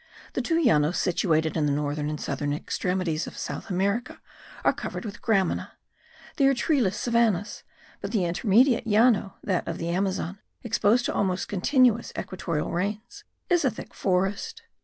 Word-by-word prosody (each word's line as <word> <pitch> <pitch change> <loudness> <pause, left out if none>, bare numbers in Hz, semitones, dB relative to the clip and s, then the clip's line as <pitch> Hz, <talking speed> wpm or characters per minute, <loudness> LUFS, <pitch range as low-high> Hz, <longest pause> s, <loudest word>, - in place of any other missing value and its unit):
The - - -1
two 330 -1 +1
Llanos 170 - +3
situated 160 -3 +1
at 160 - +1
the - - +1
northern 145 +1 -1
and 150 -1 -4
southern 145 +1 -2
extremities 175 +1 -2
of - - -9
South - - -5
America 200 +6 -1 0.5
are - - +5
covered - - -6
with 210 -1 -7
gramina; 195 -5 0 0.6
they 275 - +4
are 275 - +4
treeless 250 - +1
savannahs; 230 -4 +1 0.4
but 200 - -4
the 205 -6 +1
intermediate 225 +8 +3
Llano, 215 -2 +3
that 185 -3 -1
of 165 - -3
the 170 - -3
Amazon, 190 +1 -1 0.2
exposed 235 +1 +2
to - - -1
almost 190 -2 0
continual 235 +3 +3 0.2
equatorial 170 -4 -3
rains, 210 +6 -4 0.2
is 350 -4 +3
a 265 - +4
thick - - -9
forest. 195 - -1
195 Hz, 160 wpm, -26 LUFS, 170-235 Hz, 0.6 s, are